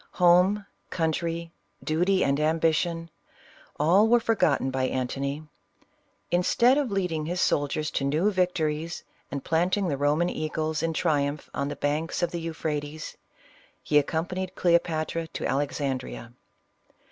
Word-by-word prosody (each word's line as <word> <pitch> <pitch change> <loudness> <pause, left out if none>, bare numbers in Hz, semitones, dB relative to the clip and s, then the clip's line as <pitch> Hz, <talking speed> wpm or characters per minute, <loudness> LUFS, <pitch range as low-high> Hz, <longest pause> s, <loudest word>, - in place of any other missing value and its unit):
Home, 180 +3 +4 0.2
country, 165 0 -2 0.3
duty 180 +5 +2
and 140 +1 +1
ambition 165 +1 +1 0.3
— - - -26
all 180 +8 +5
were 240 +1 +5
forgotten 160 - +1
by 130 0 0
Antony. 135 +3 -2 0.9
Instead 235 +9 +4
of 280 -4 -1
leading 175 -6 -1
his 175 +2 -2
soldiers 150 +1 0
to - - -1
new 155 +9 +2
victories, 165 -3 -1 0.3
and 140 -1 -5
planting 180 +4 +1
the 140 - 0
Eoman 150 +5 +1
eagles 155 0 -2
in 165 0 0
triumph 145 -3 -1
on 140 - -1
the - - -4
banks 155 +4 -1
of 175 - +1
the 170 - -4
Euphrates, 155 -2 -4 0.7
he 150 - +4
accompanied 180 +5 -3
Cleo 170 -1 +4
patra 165 0 -3
to - - -7
Alexandrea. 135 -4 -2
160 Hz, 135 wpm, -26 LUFS, 145-175 Hz, 0.9 s, all